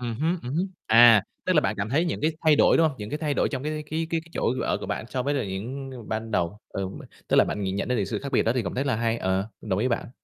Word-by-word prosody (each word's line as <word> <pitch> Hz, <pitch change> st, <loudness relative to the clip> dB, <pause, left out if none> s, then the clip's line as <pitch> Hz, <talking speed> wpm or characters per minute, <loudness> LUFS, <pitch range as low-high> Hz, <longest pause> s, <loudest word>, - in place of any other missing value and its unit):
Ừm 120 Hz, -2 st, -3 dB
hứm, 170 Hz, +3 st, +1 dB
ừm 125 Hz, +3 st, -5 dB
hứm, 175 Hz, +4 st, +1 dB, 0.2 s
à, 115 Hz, -2 st, +8 dB, 0.2 s
tức -, -, +2 dB
là -, -, +5 dB
bạn -, -, 0 dB
cảm 100 Hz, +2 st, -2 dB
thấy 150 Hz, +7 st, +2 dB
những 170 Hz, -, -2 dB
cái 155 Hz, +2 st, +1 dB
thay 155 Hz, -2 st, +6 dB
đổi, -, -, +5 dB
đúng 160 Hz, -1 st, +4 dB
hông? 135 Hz, -, -8 dB
Những 105 Hz, +2 st, -6 dB
cái 150 Hz, -, -2 dB
thay 150 Hz, -2 st, -1 dB
đổi -, -, +1 dB
trong 130 Hz, -3 st, -4 dB
cái 150 Hz, +2 st, -2 dB, 0.2 s
cái 160 Hz, +1 st, -1 dB
cái 165 Hz, -, 0 dB
cái 165 Hz, -, -19 dB
chỗ 125 Hz, -, 0 dB
ở -, -, 0 dB
của -, -, -7 dB
bạn -, -, -3 dB
so 130 Hz, 0 st, -2 dB
với 145 Hz, +3 st, 0 dB
là 140 Hz, -, 0 dB
những 120 Hz, +8 st, -5 dB, 0.2 s
ban 110 Hz, 0 st, -3 dB
đầu, 95 Hz, -1 st, -1 dB
ừm, 95 Hz, -1 st, -5 dB, 0.3 s
tức -, -, +2 dB
là -, -, +7 dB
bạn 105 Hz, -, -3 dB
nhìn 95 Hz, 0 st, -2 dB
nhận 100 Hz, -, -2 dB
đến 125 Hz, -, +1 dB
từ 100 Hz, -, +1 dB
sự 95 Hz, -, -3 dB
khác 140 Hz, 0 st, -6 dB
biệt -, -, +4 dB
đó 115 Hz, -, +1 dB
thì 125 Hz, -, +1 dB
cũng 90 Hz, -, -4 dB
rất 135 Hz, +3 st, -1 dB
là 130 Hz, -5 st, +1 dB
hay, 115 Hz, 0 st, 0 dB
ờ, 95 Hz, +1 st, -1 dB
đồng 100 Hz, -3 st, -2 dB
ý 125 Hz, +4 st, +1 dB
với -, -, +2 dB
bạn. -, -, -10 dB
125 Hz, 335 wpm, -25 LUFS, 105-145 Hz, 0.3 s, à